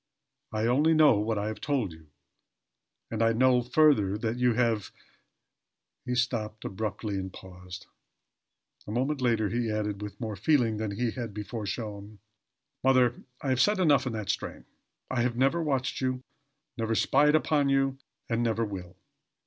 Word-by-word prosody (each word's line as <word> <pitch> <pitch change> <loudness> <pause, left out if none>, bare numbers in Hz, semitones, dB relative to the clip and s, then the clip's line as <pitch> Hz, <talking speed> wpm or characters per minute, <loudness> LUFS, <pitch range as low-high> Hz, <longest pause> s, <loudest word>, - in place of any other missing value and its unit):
I 110 0 -1
only 145 +7 +3
know 150 -9 +6
what 110 +1 -1
I 100 - -1
have 110 0 -5
told 135 - 0
you, 80 -1 -16 1.0
and 115 0 -2
I 115 0 +4
know 125 +1 +4
further 120 -6 +3
that 110 +1 -2
you 125 -1 +3
have 115 -4 +1 0.6
" - - -57
He 125 - 0
stopped 115 -3 -2
abruptly 105 0 -3
and 95 0 -5
paused. 90 0 -10 1.0
A - - -5
moment 130 +5 -1
later 115 -4 +2
he 120 +2 -1
added, 105 -1 -2
with 105 -1 -7
more 110 -3 -4
feeling 115 - +2
than 110 0 -2
he 120 -1 0
had 115 -5 -6
before 105 0 -5
shown, 105 0 -6 0.7
"Mother, 130 -2 +4 0.3
I 140 - -1
have 130 0 +2
said 210 +1 +3
enough 145 -7 +4
in 120 - -2
that 105 -2 -1
strain. 110 - -6 0.5
I 130 -2 +1
have 120 0 0
never 135 +6 +2
watched 135 -5 -1
you, 130 -1 -1 0.6
never 115 0 0
spied 150 +6 +4
upon 150 -2 +2
you, 135 0 +1 0.3
and 115 0 0
never 115 -1 +1
will. 95 -3 -7
115 Hz, 165 wpm, -28 LUFS, 105-130 Hz, 1.0 s, know